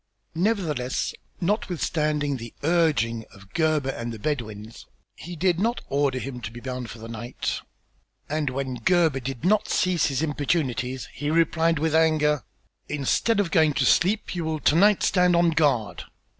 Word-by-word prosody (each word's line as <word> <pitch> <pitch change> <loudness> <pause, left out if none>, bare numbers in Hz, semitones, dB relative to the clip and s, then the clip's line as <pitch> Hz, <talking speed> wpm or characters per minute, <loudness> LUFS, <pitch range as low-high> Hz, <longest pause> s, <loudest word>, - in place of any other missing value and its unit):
Nevertheless, 165 - -1 0.3
notwithstanding 155 -7 0
the 115 -1 -9
urging 145 -9 +2
of 100 -1 -17
Gebhr 155 -4 +1
and 115 -2 -5
the 115 - -6
Bedouins, 110 -4 -5 0.3
he 175 +2 -8
did 175 +1 +1
not 230 +4 0
order 140 -2 +1
him 125 -1 -5
to 110 - -5
be 120 +1 -10
bound 125 -1 -5
for - - -9
the 115 0 -9
night, 115 +2 -4 0.7
and 150 -1 -1
when 130 -1 -3
Gebhr 165 -5 +3
did 130 +3 -5
not 210 +3 +2
cease 180 -2 +2
his 140 +2 -1
importunities, 135 -4 -1
he 145 - -3
replied 165 0 +2
with 155 +1 0
anger: 155 -3 +3 0.5
"Instead 150 - +1
of 195 -4 0
going 160 -4 +4
to - - +1
sleep, 205 +4 +2
you 175 -2 -3
will 160 -1 -2
to - - +4
night 200 +3 +4
stand 180 -1 +3
on 170 0 +4
guard. 145 -9 +1
150 Hz, 160 wpm, -25 LUFS, 125-170 Hz, 0.7 s, going